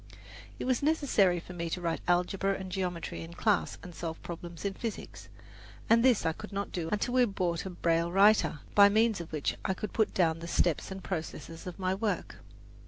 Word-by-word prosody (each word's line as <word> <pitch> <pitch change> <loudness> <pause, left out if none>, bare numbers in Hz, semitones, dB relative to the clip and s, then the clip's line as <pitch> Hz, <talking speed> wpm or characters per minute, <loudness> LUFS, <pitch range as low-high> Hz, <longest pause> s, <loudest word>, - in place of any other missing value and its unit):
It - - -4
was 255 -1 +1
necessary 275 - +3
for 180 - -10
me 170 -1 -3
to 180 - -2
write 170 -2 -2
algebra 185 +2 +1
and 190 -1 -6
geometry 180 -3 -3
in 165 +1 -9
class 210 +1 +1
and 180 - -9
solve 160 +1 -5
problems 170 +1 -7
in 200 - 0
physics, 225 +1 -6 0.6
and 230 0 +6
this 250 -4 +4
I 160 - +3
could 210 +6 -10
not 200 0 -3
do 165 -3 -3
until 210 +4 0
we 255 -1 +5
bought 180 -4 -2
a - - -4
braille 170 -1 0
writer, 195 -6 +4
by 200 0 +8
means 220 -2 +2
of 170 - -9
which 155 -3 -1
I 190 - 0
could 210 +1 -5
put 220 - +2
down 165 -3 +2
the 170 - -7
steps 170 -2 +1
and 190 -1 -7
processes 165 -2 -5
of 180 - -6
my 185 -1 0
work. 195 -2 -2
185 Hz, 205 wpm, -30 LUFS, 170-205 Hz, 0.6 s, by